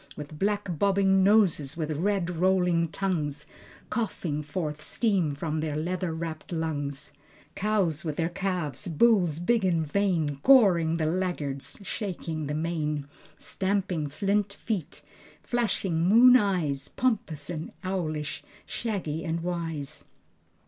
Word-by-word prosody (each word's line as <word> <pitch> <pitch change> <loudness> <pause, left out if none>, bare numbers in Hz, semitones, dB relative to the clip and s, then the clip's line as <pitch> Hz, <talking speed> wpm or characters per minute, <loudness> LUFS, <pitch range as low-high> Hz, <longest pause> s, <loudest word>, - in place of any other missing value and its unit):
With 150 +1 -8
black 200 -5 -1
bobbing 195 -1 +4
noses, 185 -8 +3
with 155 -2 -2
red 180 +3 0
rolling 180 -1 +2
tongues, 165 -5 -2 0.5
Coughing 175 -9 -2
forth 150 0 -4
steam 175 -3 0
from 155 +1 -2
their 155 -1 -2
leather 180 +3 -2
wrapped 160 0 -5
lungs, 150 -3 -3 0.4
Cows 195 -6 0
with 155 -3 -3
their 165 +1 0
calves, 180 -2 -3
bulls 175 -2 +3
big 220 +6 +1
and 170 -4 +2
vain, 160 -5 0
Goring 175 - +5
the 160 - 0
laggards, 155 -5 -2
shaking 170 -7 -4
the 150 - -2
mane, 155 -2 -2 0.3
Stamping 190 -6 -1
flint 200 +5 0
feet, 200 -6 -4 0.4
flashing 205 -8 0
moon 235 +8 +7
eyes, 175 - +1
Pompous 185 - -1
and 160 -2 -5
owlish, 155 -6 -3 0.2
shaggy 180 -9 -3
and 165 0 -2
wise. 165 -5 -4
170 Hz, 120 wpm, -27 LUFS, 155-195 Hz, 0.5 s, moon